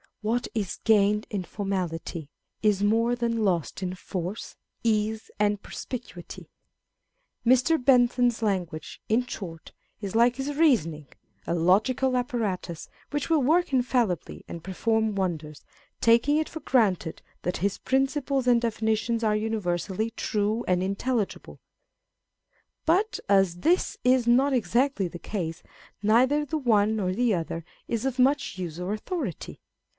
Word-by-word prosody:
What 235 Hz, +3 st, 0 dB
is 205 Hz, -5 st, -2 dB
gained 210 Hz, -1 st, +3 dB
in 200 Hz, -3 st, -2 dB
formality, 175 Hz, -5 st, -4 dB, 0.3 s
is 205 Hz, -2 st, +2 dB
more 230 Hz, +3 st, +3 dB
than 230 Hz, -2 st, -1 dB
lost 180 Hz, -3 st, 0 dB
in 185 Hz, -1 st, -3 dB
force, 185 Hz, +2 st, -5 dB, 0.3 s
ease, 220 Hz, -1 st, 0 dB
and 205 Hz, -1 st, +1 dB
perspicuity. 235 Hz, -9 st, -8 dB, 1.0 s
Mr. 255 Hz, +5 st, +4 dB
Bentham's 245 Hz, -2 st, +3 dB
language, 180 Hz, -6 st, -2 dB
in 235 Hz, +3 st, +2 dB
short, 165 Hz, -9 st, -8 dB, 0.3 s
is 200 Hz, -1 st, -5 dB
like 240 Hz, +2 st, +4 dB
his 275 Hz, +2 st, -3 dB
reasoning, 165 Hz, -, +2 dB, 0.4 s
a -, -, 0 dB
logical 215 Hz, +10 st, +2 dB
apparatus, 210 Hz, -9 st, -3 dB, 0.2 s
which 290 Hz, +2 st, -2 dB
will 320 Hz, -3 st, +4 dB
work 325 Hz, +4 st, +2 dB
infallibly 245 Hz, -, 0 dB
and 170 Hz, -1 st, -8 dB
perform 220 Hz, +3 st, 0 dB
wonders, 160 Hz, -6 st, -3 dB, 0.4 s
taking 235 Hz, +6 st, +4 dB
it 315 Hz, -, -1 dB
for 320 Hz, -, -7 dB
granted 195 Hz, -10 st, +1 dB, 0.2 s
that 180 Hz, -, -1 dB
his 200 Hz, +2 st, -1 dB
principles 270 Hz, 0 st, 0 dB
and 240 Hz, -1 st, +5 dB
definitions 225 Hz, 0 st, 0 dB
are 215 Hz, -1 st, +2 dB
universally 215 Hz, -1 st, -1 dB
true 215 Hz, 0 st, -1 dB
and 180 Hz, -1 st, +2 dB
intelligible; 205 Hz, +3 st, -2 dB, 1.3 s
but 385 Hz, +7 st, +2 dB
as 195 Hz, -3 st, +4 dB
this 340 Hz, -, +1 dB
is 250 Hz, -1 st, +3 dB
not 265 Hz, +4 st, +4 dB
exactly 245 Hz, -3 st, +1 dB
the 175 Hz, 0 st, -9 dB
case, 170 Hz, -5 st, -4 dB, 0.4 s
neither 255 Hz, +8 st, +4 dB
the 315 Hz, +2 st, -2 dB
one 220 Hz, -5 st, +3 dB
nor 190 Hz, -4 st, 0 dB
the 230 Hz, +3 st, +1 dB
other 165 Hz, 0 st, -4 dB, 0.2 s
is 230 Hz, -1 st, -2 dB
of 265 Hz, -1 st, -2 dB
much 270 Hz, -5 st, +2 dB
use 175 Hz, -3 st, -5 dB
or 180 Hz, +3 st, -2 dB
authority. 225 Hz, -, -5 dB
220 Hz, 135 wpm, -26 LUFS, 185-250 Hz, 1.3 s, and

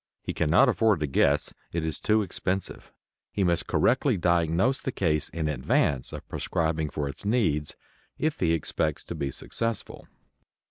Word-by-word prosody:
He -, -, -3 dB
cannot 85 Hz, -, +4 dB
afford 110 Hz, -6 st, +3 dB
to -, -, +2 dB
guess. 70 Hz, +1 st, +2 dB, 0.2 s
It 85 Hz, -1 st, -2 dB
is 80 Hz, -2 st, -3 dB
too 110 Hz, 0 st, +2 dB
expensive. 95 Hz, 0 st, -3 dB, 0.4 s
He 100 Hz, -, 0 dB
must 85 Hz, -2 st, +1 dB
correctly -, -, +2 dB
diagnose 85 Hz, +8 st, +2 dB
the 130 Hz, -, -2 dB
case 80 Hz, -, 0 dB
in 80 Hz, -1 st, -3 dB
advance 70 Hz, -3 st, +1 dB
of -, -, -8 dB
prescribing 80 Hz, -2 st, -1 dB
for 75 Hz, -1 st, -3 dB
its 70 Hz, -, -8 dB
needs 100 Hz, -10 st, 0 dB, 0.4 s
if 155 Hz, 0 st, -1 dB
he 85 Hz, -2 st, +2 dB
expects 80 Hz, -, -1 dB
to -, -, -6 dB
be 70 Hz, -, -2 dB
successful. 115 Hz, -, -3 dB
85 Hz, 155 wpm, -27 LUFS, 75-105 Hz, 0.4 s, cannot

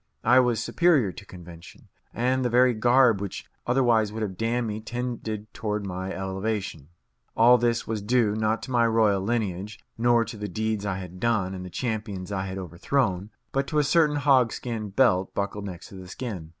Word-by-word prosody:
I 125 Hz, +1 st, +6 dB
was 125 Hz, -3 st, +2 dB
superior 155 Hz, -, +3 dB
to 100 Hz, -, -12 dB
convention, 85 Hz, -2 st, -13 dB, 0.2 s
and 130 Hz, +2 st, 0 dB
the 125 Hz, -, +1 dB
very 125 Hz, +1 st, +4 dB
garb 120 Hz, -1 st, +4 dB
which 100 Hz, -2 st, -5 dB, 0.2 s
otherwise 120 Hz, -4 st, +3 dB
would 110 Hz, +1 st, -4 dB
have 95 Hz, -3 st, -4 dB
damned 115 Hz, +3 st, -1 dB
me 110 Hz, 0 st, -4 dB
tended 115 Hz, -2 st, -5 dB
toward 105 Hz, -2 st, -3 dB
my 95 Hz, 0 st, -4 dB
elevation. 95 Hz, -1 st, -3 dB
And 70 Hz, +2 st, -21 dB, 0.5 s
all 120 Hz, +2 st, +6 dB
this 120 Hz, 0 st, 0 dB
was 110 Hz, -2 st, -3 dB
due, 110 Hz, -1 st, +2 dB
not 110 Hz, +1 st, 0 dB
to 130 Hz, -, -7 dB
my 120 Hz, -2 st, +3 dB
royal 110 Hz, -4 st, +3 dB
lineage, 105 Hz, -2 st, -2 dB, 0.2 s
nor 120 Hz, 0 st, +3 dB
to 110 Hz, +1 st, -8 dB
the 105 Hz, 0 st, -4 dB
deeds 110 Hz, +1 st, -2 dB
I 95 Hz, -2 st, -2 dB
had 90 Hz, -1 st, -8 dB
done 105 Hz, -4 st, 0 dB
and 90 Hz, -1 st, -6 dB
the 90 Hz, -, -7 dB
champions 105 Hz, -3 st, -4 dB
I 95 Hz, -1 st, -2 dB
had 95 Hz, 0 st, -5 dB
overthrown, 95 Hz, -, -1 dB, 0.2 s
but 135 Hz, 0 st, -1 dB
to 155 Hz, -, -2 dB
a 150 Hz, -, +4 dB
certain 150 Hz, 0 st, +3 dB
hogskin 125 Hz, -6 st, +1 dB
belt 95 Hz, -4 st, +2 dB
buckled 100 Hz, 0 st, -3 dB
next 90 Hz, -3 st, -8 dB
the 95 Hz, -2 st, -10 dB
skin. 95 Hz, -7 st, -6 dB
110 Hz, 190 wpm, -26 LUFS, 95-120 Hz, 0.5 s, I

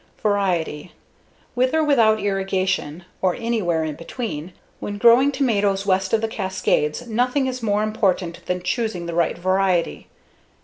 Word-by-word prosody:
Variety: 185 Hz, -6 st, -1 dB, 0.6 s
With 255 Hz, +4 st, +1 dB
or 320 Hz, -, +3 dB
without 230 Hz, -7 st, +4 dB
irrigation 190 Hz, -4 st, -1 dB, 0.2 s
or 185 Hz, -2 st, +2 dB
anywhere 215 Hz, -9 st, -1 dB
in 155 Hz, -1 st, -3 dB
between, 170 Hz, -, -6 dB, 0.3 s
when 205 Hz, -, -5 dB
growing 240 Hz, +6 st, +5 dB
tomatoes 205 Hz, -8 st, +1 dB
west 190 Hz, -1 st, +1 dB
of 225 Hz, -, +2 dB
the 225 Hz, -, 0 dB
Cascades, 190 Hz, -3 st, -1 dB
nothing 250 Hz, +4 st, 0 dB
is 255 Hz, -1 st, -3 dB
more 210 Hz, -1 st, +1 dB
important 190 Hz, -5 st, -1 dB
than 180 Hz, 0 st, -2 dB
choosing 205 Hz, -3 st, -2 dB
the 170 Hz, -, -4 dB
right 170 Hz, 0 st, +1 dB
variety. 185 Hz, -, 0 dB
195 Hz, 140 wpm, -22 LUFS, 180-230 Hz, 0.6 s, growing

